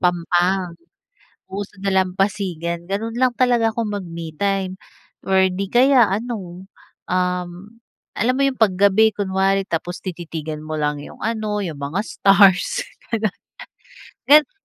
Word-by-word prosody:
pampang 175 +1 +1 0.8
oo 200 +1 -4
sa - - -25
may 195 - 0
dalampasigan. 185 -3 -1
Ganoon 225 +4 -3
lang 255 -1 +2
talaga 235 -3 +2
ako 230 - -1 0.2
mag-me 170 -3 -7
time 195 -2 -1 0.5
or 190 0 +4
'di 195 +2 -3
kaya 255 -2 +6
ano, 195 -4 -4 0.5
um, 180 -1 0 0.6
alam 235 +4 +1
mo - - -1
iyong 260 -3 -3
pag 190 -4 +3
gabi 200 +2 +5
kunwari 195 -1 0
tapos 175 +2 -3
tititigan 160 -4 -6
mo 155 0 -5
lang 150 -1 -1
iyong - - -12
ano 215 -2 -2
iyong 160 -8 -5
mga 145 +7 -2
stars, 200 - +4 0.2
gano'n. 220 -3 -1 0.9
Ganun 300 +4 +6
195 Hz, 135 wpm, -21 LUFS, 175-215 Hz, 0.9 s, kaya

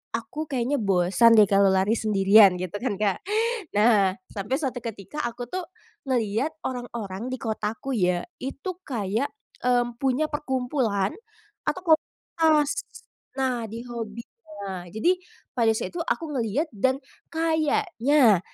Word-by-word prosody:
aku 265 +7 -5
kayaknya 265 +1 0
bosan 200 +3 +4
deh 215 - +8
kalau 200 0 +4
lari 190 +2 +3
sendirian 205 -3 +5
gitu 185 +2 -4
kan, 235 -4 -1
Kak. 200 -2 0 0.6
Nah, 205 -4 +4 0.2
sampai 210 +7 -1
suatu 260 -5 -3
ketika 225 +5 -5
aku 240 +1 -4
tuh 370 +9 -4 0.5
ngelihat 230 +3 +1 0.2
orang-orang 235 -3 -5
di 260 - -3
kotaku 225 +4 -3
ya, 180 -5 +1 0.2
itu 275 +7 -4
kayak, 225 - -2 0.3
mmm, 245 -1 +2
punya 270 +3 +2
perkumpulan 255 -8 -1 0.5
atau 365 -3 +3
komunitas 310 -1 +1 0.7
nah, 255 -3 0
di 230 +2 -7
hobinya. 235 -1 -7 0.3
Nah, 185 -2 -5
jadi 220 - +2 0.4
pada 225 -3 +3
saat - - -4
itu 345 - -4
aku 335 0 -1
ngelihat 265 +5 -1
dan 260 +5 +1 0.3
kayaknya 310 - +3
235 Hz, 130 wpm, -25 LUFS, 205-275 Hz, 0.7 s, deh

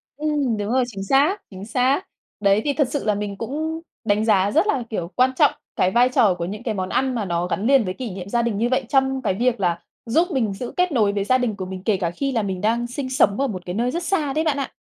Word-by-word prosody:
Ừm, 290 -5 0
đúng 205 +1 -3
rồi, 260 +1 +3
chính 195 -5 -6
xác, 285 - +2
chính 190 +1 -8
xác. 255 - +1 0.4
Đấy, 200 0 +3
thì 290 - +1
thật 285 -2 +1
sự 285 - -2
là 210 -1 +2
mình 200 -1 -4
cũng 315 +8 -3 0.2
đánh 210 0 +2
giá 200 -2 +3
rất 320 - +3
là, 270 - +1
kiểu, 175 -5 -4
quan 255 +1 +4
trọng - - +5 0.2
cái 185 - +2
vai 245 +3 +4
trò 215 -6 +4
của 170 -1 -4
những 205 +4 -6
cái 225 - -1
món 185 -2 -3
ăn 260 +3 0
mà 220 -4 -1
nó 175 -1 -1
gắn 190 +3 -2
liền 270 -2 +5
với 185 - -2
kỷ 250 +3 -5
niệm 185 +1 -7
gia 235 +3 +1
đình 230 -3 -1
như 235 +3 +1
vậy 260 0 +1
trong 265 -1 +2
cái 215 -6 0
việc 240 +3 0
là 175 -3 0 0.3
giúp 320 +10 +2
mình 235 -9 0
giữ 240 +5 -6
kết 360 0 +2
nối 215 -7 +2
với 200 -1 0
gia 255 +6 +3
đình 245 -4 -1
của 190 -2 -5
mình, 185 0 -7
kể 205 -1 +2
cả 175 -3 -1
khi 275 +10 -2
là 230 -4 0
mình 190 -2 -3
đang 230 +3 +1
sinh 260 +2 -5
sống 255 -5 +2
ở 275 - +2
một 185 -7 -6
cái 180 - -4
nơi 240 +3 0
rất 345 +5 -3
xa 310 -7 0
đấy 310 +3 +1
bạn 305 -3 +1
ạ. 275 - -3
235 Hz, 285 wpm, -22 LUFS, 200-270 Hz, 0.4 s, trọng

